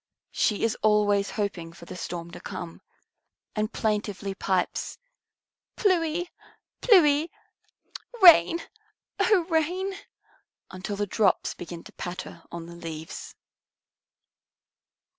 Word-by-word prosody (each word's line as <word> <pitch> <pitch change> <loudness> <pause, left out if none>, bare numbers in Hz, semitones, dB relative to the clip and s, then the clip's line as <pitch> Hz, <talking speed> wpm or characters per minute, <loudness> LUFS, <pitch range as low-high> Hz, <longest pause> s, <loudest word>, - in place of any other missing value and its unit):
She 210 - +1
is 225 -1 +2
always 205 -2 +3
hoping 185 -6 -3
for 170 - -13
the - - -8
storm 170 -1 -6
to - - -9
come, 170 -2 -7 0.7
and 215 +1 -1
plaintively 205 -2 -2
pipes, 190 -1 -1 0.8
"Plui 350 -4 +2 0.6
plui! 320 -8 +5 0.9
Rain, 345 -2 +8 0.6
O 405 -5 +4
Rain!" 355 +4 0 0.8
until 185 +2 -5
the 205 +1 -1
drops 205 +1 +1
begin 170 -1 -8
to - - -13
patter 180 -1 -7
on 170 -1 -6
the 170 - -10
leaves. 160 -2 -7
205 Hz, 105 wpm, -26 LUFS, -, 0.9 s, Rain